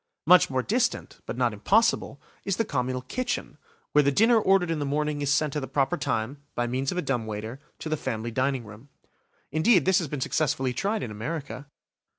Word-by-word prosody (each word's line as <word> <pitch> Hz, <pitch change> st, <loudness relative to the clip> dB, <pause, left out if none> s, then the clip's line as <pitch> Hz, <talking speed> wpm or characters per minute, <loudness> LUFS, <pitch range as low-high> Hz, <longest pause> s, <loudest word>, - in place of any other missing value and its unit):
Much 180 Hz, 0 st, +6 dB
more 130 Hz, -1 st, 0 dB
distant, 240 Hz, -, -1 dB
but -, -, -4 dB
not 120 Hz, -3 st, +1 dB
impossible, 195 Hz, -, +2 dB, 0.2 s
is 195 Hz, -2 st, -1 dB
the 225 Hz, -, +1 dB
communal 125 Hz, -5 st, -2 dB
kitchen, 255 Hz, -, -3 dB, 0.3 s
where 150 Hz, -, +5 dB
the 140 Hz, -, +3 dB
dinner 225 Hz, -, +5 dB
ordered 190 Hz, -4 st, +3 dB
in 160 Hz, -, -1 dB
the -, -, -1 dB
morning 150 Hz, +1 st, -1 dB
is 140 Hz, -1 st, 0 dB
sent 150 Hz, 0 st, +1 dB
at -, -, +1 dB
the 135 Hz, -, -5 dB
proper 135 Hz, -2 st, +1 dB
time, 140 Hz, -1 st, -2 dB
by 120 Hz, -, 0 dB
means 130 Hz, +3 st, -1 dB
of 180 Hz, -, -4 dB
a 180 Hz, -, 0 dB
dumb 125 Hz, -5 st, -1 dB
waiter, 110 Hz, +4 st, -5 dB, 0.2 s
to -, -, -7 dB
the 155 Hz, -, 0 dB
family 120 Hz, -5 st, -4 dB
dining 130 Hz, 0 st, 0 dB
room. 110 Hz, +6 st, -13 dB, 0.6 s
Indeed, 160 Hz, -, +4 dB
this 190 Hz, -1 st, +4 dB
has 170 Hz, -, -3 dB
been 145 Hz, 0 st, -4 dB
successfully 130 Hz, -2 st, 0 dB
tried 205 Hz, -, -1 dB
in 110 Hz, -, -5 dB
America. 140 Hz, +5 st, -5 dB
140 Hz, 205 wpm, -26 LUFS, 125-165 Hz, 0.6 s, Much